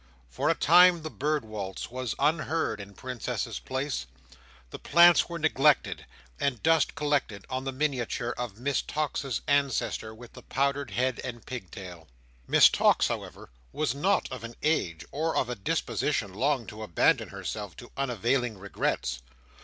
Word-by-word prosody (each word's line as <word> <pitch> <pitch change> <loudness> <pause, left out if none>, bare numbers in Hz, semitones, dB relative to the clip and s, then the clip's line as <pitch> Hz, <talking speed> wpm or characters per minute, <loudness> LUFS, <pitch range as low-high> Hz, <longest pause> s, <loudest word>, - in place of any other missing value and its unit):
For - - 0
a - - +3
time 175 +1 +6
the 155 - -5
Bird 150 -2 -1
Waltz 100 -2 -6
was 125 -2 -3
unheard 155 -5 0
in 100 0 -11
Princess's 125 -3 -4
Place, 130 - -3 0.6
the - - -7
plants 170 +1 +6
were 170 - -4
neglected, 150 -2 +2 0.3
and 140 -5 -1
dust 160 -1 +3
collected 145 -10 -1
on 130 +1 -2
the 135 - -1
miniature 130 -4 -1
of 120 -5 -5
Miss 135 +2 0
Tox's 140 -5 -2
ancestor 140 -5 0
with 115 +2 -13
the - - -11
powdered 140 -1 -1
head 125 +4 -1
and 120 -2 -7
pigtail. 95 -7 -8 0.4
Miss - - +8
Tox, - - +3
however, - - -6 0.2
was 155 - -1
not 180 +9 +1
of 130 -3 -6
an 115 0 -8
age 90 - 0
or 160 +3 -1
of 125 - +1
a 125 - -2
disposition 120 - -1
long 130 +3 0
to 110 +1 -9
abandon 105 -7 +2
herself 105 -6 -6
to 120 - -11
unavailing 125 -2 0
regrets. 95 -9 -2
130 Hz, 155 wpm, -28 LUFS, 110-150 Hz, 0.6 s, Miss